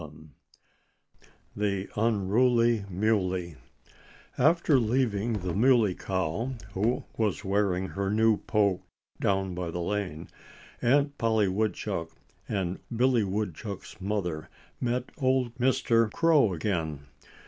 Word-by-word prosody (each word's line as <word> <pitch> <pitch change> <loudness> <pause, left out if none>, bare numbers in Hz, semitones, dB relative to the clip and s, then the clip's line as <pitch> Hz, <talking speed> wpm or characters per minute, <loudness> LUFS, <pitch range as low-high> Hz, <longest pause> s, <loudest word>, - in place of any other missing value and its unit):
XI 80 0 -12 1.3
THE 100 -2 -1
UNRULY 115 +1 +2
MULEY 90 -4 0 0.8
After 155 0 +4
leaving 115 -2 0
the 90 -5 -3
Muley 115 -2 +4
Cow, 95 +8 -2 0.2
who 110 +6 0
was 105 -2 -1
wearing 95 -2 0
her 100 0 -2
new 110 +1 +3
poke 100 -4 +1 0.4
down 95 -1 0
by 90 -1 -4
the 85 - -5
lane, 90 -3 -3 0.5
Aunt 140 +3 +2
Polly 110 -3 +2
Woodchuck 100 0 -2 0.4
and 95 -3 -2 0.2
Billy 125 -1 +3
Woodchuck's 100 +1 -5
mother 90 -6 -3 0.3
met 125 +1 -2
old 130 -3 +1
Mr. 115 -3 +2
Crow 155 - +4
again. 80 -5 -2
105 Hz, 105 wpm, -28 LUFS, 95-115 Hz, 1.3 s, After